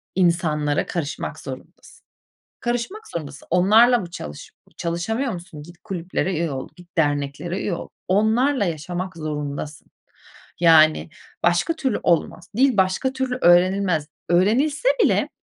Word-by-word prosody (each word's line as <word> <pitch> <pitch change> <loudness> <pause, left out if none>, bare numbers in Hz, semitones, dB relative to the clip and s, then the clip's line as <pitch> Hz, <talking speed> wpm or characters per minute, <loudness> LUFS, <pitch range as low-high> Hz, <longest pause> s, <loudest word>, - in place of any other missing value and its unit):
insanlara 165 -5 +1
karışmak 155 -4 -4
zorundasın. - - -11 0.6
Karışmak 245 - -3
zorundasın. 145 -4 -7
Onlarla 220 +8 +5
mı 175 -5 -6
çalış 75 - -8 0.2
çalışamıyor 220 +10 -2
musun? 170 -4 -9
Git, 175 +3 -14
kulüplere 185 -1 -2
üye 165 -1 -1
ol, 130 -1 -5
git, 175 0 -18
derneklere 145 +4 -1
üye 185 - -1
ol. - - -7 0.2
Onlarla 220 +6 +2
yaşamak 175 +2 -4
zorundasın. 150 -1 -5 0.7
Yani, 160 -1 +5 0.3
başka 175 - +2
türlü 265 -7 -1
olmaz. 170 -2 0
Dil 265 -2 +3
başka 190 +7 +1
türlü 260 -1 -2
öğrenilmez. 175 -2 +3 0.2
Öğrenilse 255 - +2 0.2
bile - - +2
175 Hz, 120 wpm, -22 LUFS, 160-220 Hz, 0.7 s, Onlarla